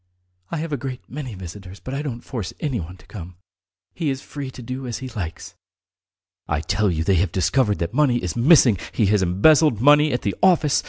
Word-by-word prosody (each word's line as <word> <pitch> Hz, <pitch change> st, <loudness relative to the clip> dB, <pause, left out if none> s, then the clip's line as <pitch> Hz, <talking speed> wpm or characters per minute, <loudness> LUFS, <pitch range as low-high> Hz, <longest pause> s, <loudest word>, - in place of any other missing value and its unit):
I 170 Hz, -, -3 dB
have 155 Hz, 0 st, -4 dB
a -, -, 0 dB
great 130 Hz, -1 st, -7 dB
many 130 Hz, -6 st, -6 dB
visitors, 95 Hz, +1 st, -9 dB
but 130 Hz, -, -7 dB
I 140 Hz, -, -2 dB
don't 125 Hz, -6 st, -5 dB
force 110 Hz, -10 st, -5 dB
anyone 95 Hz, -, -4 dB
to 90 Hz, -, -20 dB
come. 90 Hz, -4 st, -9 dB, 0.6 s
He 165 Hz, -4 st, -2 dB
is 135 Hz, -1 st, -2 dB
free 140 Hz, -1 st, -7 dB
to 125 Hz, -1 st, -10 dB
do 130 Hz, +2 st, -5 dB
as 120 Hz, -, -3 dB
he 130 Hz, -, -7 dB
likes." 90 Hz, -8 st, -6 dB, 0.9 s
"I 75 Hz, -, 0 dB
tell 105 Hz, +6 st, +1 dB
you 80 Hz, -2 st, -1 dB
they 95 Hz, +1 st, +2 dB
have 95 Hz, -3 st, -1 dB
discovered 105 Hz, +4 st, +1 dB
that 85 Hz, +5 st, -3 dB
money 135 Hz, -3 st, +3 dB
is 90 Hz, -7 st, -3 dB
missing! 120 Hz, -, +5 dB
He 110 Hz, -, +2 dB
has 105 Hz, -, +3 dB
embezzled 115 Hz, -, +4 dB
money 150 Hz, +4 st, +5 dB
at 125 Hz, -, -2 dB
the 100 Hz, -, 0 dB
office! 165 Hz, -6 st, +4 dB
120 Hz, 210 wpm, -22 LUFS, 95-140 Hz, 0.9 s, missing